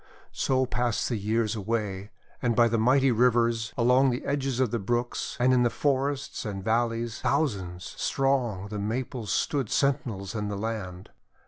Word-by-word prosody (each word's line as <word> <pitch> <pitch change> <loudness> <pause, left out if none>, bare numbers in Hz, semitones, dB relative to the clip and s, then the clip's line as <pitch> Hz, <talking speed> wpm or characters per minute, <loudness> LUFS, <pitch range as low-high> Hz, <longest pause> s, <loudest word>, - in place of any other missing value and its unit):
So 130 -1 +1
passed 120 -2 -1
the 120 - 0
years 110 +1 0
away, 105 -2 -3 0.3
and 120 -2 +1
by 120 0 +5
the 115 0 0
mighty 130 +3 +4
rivers, 115 -1 +2
along 125 +3 +4
the 125 0 -3
edges 135 -3 -1
of 130 -5 +2
the 115 - -1
brooks, 120 +4 -2
and 125 +1 +4
in 125 - +4
the 120 - +3
forests 140 +1 -1
and 100 -4 -5
valleys, 115 +2 0
thousands 100 - -1
strong 125 -8 0
the 105 -1 -4
Maples 115 0 -3
stood 135 -7 0
sentinels 115 -8 0
in 105 -2 -2
the 100 -1 -3
land. 100 -4 -5
115 Hz, 160 wpm, -27 LUFS, 105-130 Hz, 0.3 s, by